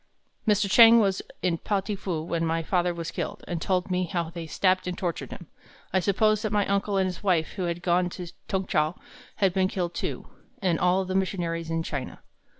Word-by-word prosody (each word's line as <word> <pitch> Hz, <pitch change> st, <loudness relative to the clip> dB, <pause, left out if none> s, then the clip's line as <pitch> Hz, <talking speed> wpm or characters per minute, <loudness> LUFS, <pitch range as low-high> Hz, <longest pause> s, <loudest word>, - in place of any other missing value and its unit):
"Mr. 210 Hz, -1 st, +3 dB
Chang 230 Hz, +3 st, +8 dB
was 195 Hz, -3 st, +1 dB, 0.2 s
in 170 Hz, -3 st, +1 dB
Pao 205 Hz, -2 st, 0 dB
ting 205 Hz, +2 st, -3 dB
fu 180 Hz, -5 st, -3 dB
when 165 Hz, 0 st, -2 dB
my 165 Hz, 0 st, 0 dB
father 180 Hz, +1 st, +1 dB
was 170 Hz, -1 st, -5 dB
killed, 205 Hz, +1 st, -5 dB
and 170 Hz, -2 st, -3 dB
told 185 Hz, +1 st, 0 dB
me 180 Hz, 0 st, +1 dB
how 170 Hz, -1 st, -3 dB
they 170 Hz, -1 st, -6 dB
stabbed 185 Hz, +3 st, +1 dB
and 180 Hz, 0 st, -3 dB
tortured 175 Hz, -3 st, -3 dB
him. 175 Hz, -, -9 dB, 0.5 s
I 190 Hz, -, +4 dB
supposed 215 Hz, +3 st, +2 dB
that 215 Hz, -, -2 dB
my 205 Hz, -1 st, +2 dB
uncle 200 Hz, 0 st, 0 dB
and 190 Hz, -, +3 dB
his 185 Hz, -1 st, -4 dB
wife, 175 Hz, -5 st, +2 dB
who 185 Hz, -3 st, -4 dB
had 170 Hz, 0 st, -3 dB
gone 180 Hz, 0 st, +2 dB
to 175 Hz, -2 st, -7 dB, 0.2 s
Tung 190 Hz, -1 st, -1 dB
chow, 155 Hz, -2 st, +1 dB, 0.4 s
had 195 Hz, -4 st, +2 dB
been 190 Hz, -1 st, +2 dB
killed, 175 Hz, -2 st, -3 dB
too, -, -, -4 dB, 0.3 s
and 180 Hz, -5 st, +1 dB
all 185 Hz, +1 st, +2 dB
the 185 Hz, -, -3 dB
missionaries 170 Hz, -4 st, -1 dB
in 165 Hz, 0 st, -1 dB
China. 140 Hz, -5 st, -5 dB
180 Hz, 215 wpm, -26 LUFS, 170-195 Hz, 0.5 s, Chang